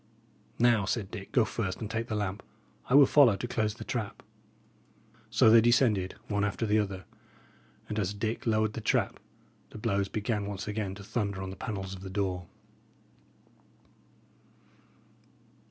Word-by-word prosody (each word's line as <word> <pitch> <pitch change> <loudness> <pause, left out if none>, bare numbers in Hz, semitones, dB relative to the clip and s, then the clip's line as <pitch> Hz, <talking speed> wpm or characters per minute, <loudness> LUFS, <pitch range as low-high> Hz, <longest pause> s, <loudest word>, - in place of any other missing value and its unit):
"Now," 115 -4 +4
said 105 -1 -2
Dick, 100 -4 -8
"go 120 -4 +4
first 100 -6 -3
and 110 - -4
take 115 +2 -3
the 110 - -3
lamp. 100 0 -2 0.5
I 125 - +4
will 140 -1 +9
follow 130 -6 +6
to 110 +5 -4
close 110 -3 -1
the - - -8
trap." 120 -6 -4 1.1
So 110 - +5
they 115 0 +8
descended 110 -5 +3
one 100 -1 0
after 105 +3 -1
the 110 0 +3
other, 95 -3 -3 0.8
and 105 - -3
as 100 0 -1
Dick 110 +3 -3
lowered 110 -1 +2
the 115 - -5
trap, - - 0 0.5
the - - -10
blows 100 -3 0
began 105 -1 -2
once 100 -1 -5
again 105 -2 -3
to 100 - -10
thunder 100 -2 -2
on 95 - -5
the - - -7
panels 95 -4 -5
of 95 - -9
the 95 - -7
door. 95 -3 -2
105 Hz, 160 wpm, -29 LUFS, 100-115 Hz, 1.1 s, will